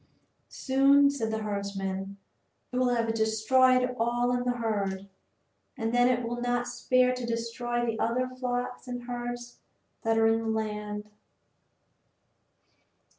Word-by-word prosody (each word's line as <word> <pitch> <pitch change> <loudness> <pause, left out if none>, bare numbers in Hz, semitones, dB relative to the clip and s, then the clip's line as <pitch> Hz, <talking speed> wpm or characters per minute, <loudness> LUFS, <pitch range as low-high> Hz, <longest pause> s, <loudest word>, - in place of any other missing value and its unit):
"Soon," 275 +1 +4
said 235 -6 -2
the 220 0 -2
herdsman, 200 -1 -4 0.5
"it 250 - -3
will 255 0 +3
have 230 -2 +1
destroyed 250 +3 +3
all 240 +1 +1
in 245 0 0
the 245 0 0
herd, 200 -4 -2 0.7
and 225 -1 -2
then 245 0 +5
it 245 -2 +1
will 240 +1 -4
not 245 0 0
spare 250 +1 +2
to 250 -1 -5
destroy 235 +1 -2
the 225 -2 -2
other 250 +3 +1
flocks 250 0 -4
and 245 -1 -5
herds 240 0 -6 0.4
that 225 -1 +1
are 225 - +4
in 225 0 +3
the 225 - -4
land." 210 -1 -3
240 Hz, 135 wpm, -28 LUFS, 220-250 Hz, 0.7 s, then